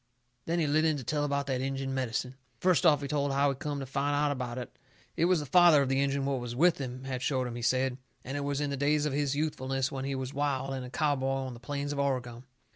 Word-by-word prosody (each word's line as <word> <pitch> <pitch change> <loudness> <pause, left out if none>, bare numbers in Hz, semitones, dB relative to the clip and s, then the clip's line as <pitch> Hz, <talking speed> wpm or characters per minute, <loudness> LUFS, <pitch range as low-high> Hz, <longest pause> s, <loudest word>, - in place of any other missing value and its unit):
Then 170 +1 0
he 165 - +2
lit 150 +2 +2
in 155 -2 +2
to 135 - -6
tell 145 +4 -1
about 140 -1 0
that 130 -2 -1
Injun 135 0 -2
medicine. 125 -1 -2 0.2
First 180 +3 +3
off 145 -2 +4
he - - -2
told 145 0 0
how 140 +1 +3
he 135 - -1
come 145 +1 -4
to - - -4
find 140 +2 -1
out 145 0 +2
about 125 -3 -4
it. 125 - -7 0.4
It 165 - +2
was 180 -3 +3
the - - -5
father 170 -2 +6
of 130 - -2
the 135 +1 +2
Injun 140 0 0
what 135 -2 0
was 120 -1 -5
with 170 +5 +4
him 130 -1 -5
had 130 -2 -4
showed 130 -1 0
him, 120 - -4
he 120 - -5
said. 130 +2 +1 0.2
And 135 - -5
it - - -1
was 140 0 -1
in 145 -1 -1
the 140 - -2
days 145 +2 +2
of 150 - -1
his 145 -1 0
youthfulness, 135 -3 -1
when 135 -1 -4
he 135 0 -2
was 130 +1 -4
wild, 135 -1 -1
and 130 -1 -4
a 125 - -7
cowboy 145 -1 0 0.2
on 130 - -5
the 120 - -11
plains 145 +2 -3
of 140 - -4
Oregon. 125 -3 -2
140 Hz, 275 wpm, -30 LUFS, 130-145 Hz, 0.4 s, father